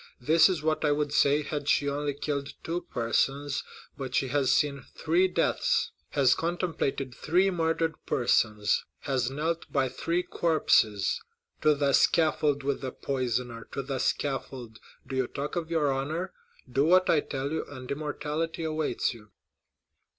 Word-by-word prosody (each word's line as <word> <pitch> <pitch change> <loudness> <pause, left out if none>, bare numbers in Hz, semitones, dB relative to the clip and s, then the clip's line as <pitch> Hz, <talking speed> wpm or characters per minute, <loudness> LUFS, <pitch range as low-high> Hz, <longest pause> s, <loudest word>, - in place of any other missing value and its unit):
This 160 +9 +5
is 175 -5 -2
what 155 0 0
I 150 - +3
would 145 0 0
say 145 +1 +4
had 145 0 -3
she 145 - +3
only 145 0 -1
killed 140 -1 -3
two 170 +2 -2
persons 135 +4 0 0.3
but 130 -2 -5
she 135 - +1
has 135 -1 +2
seen 140 -1 +1
three 170 +4 +2
deaths,—has 130 - +1
contemplated 165 -6 -2
three 180 +9 +2
murdered 165 -1 0
persons,—has 120 +3 +1
knelt 160 +5 -3
by 135 -2 +1
three 170 +7 -1
corpses! 150 - +2 0.4
To 155 -1 +4
the 140 -1 +1
scaffold 150 -3 +3
with 140 0 -1
the 130 -2 -4
poisoner—to 125 -1 -3
the 135 0 -3
scaffold! 130 -6 -2 0.3
Do 135 0 -6
you 130 -1 +1
talk 145 +1 -5
of 165 -2 -3
your 155 -4 +2
honor? 155 +7 -3 0.3
Do 135 +2 +1
what 185 +3 +5
I 155 - +4
tell 140 0 -4
you, 160 - -1
and 130 -2 -9
immortality 155 +3 -3
awaits 155 -1 -1
you!" 105 -3 -15
145 Hz, 145 wpm, -28 LUFS, 135-160 Hz, 0.4 s, This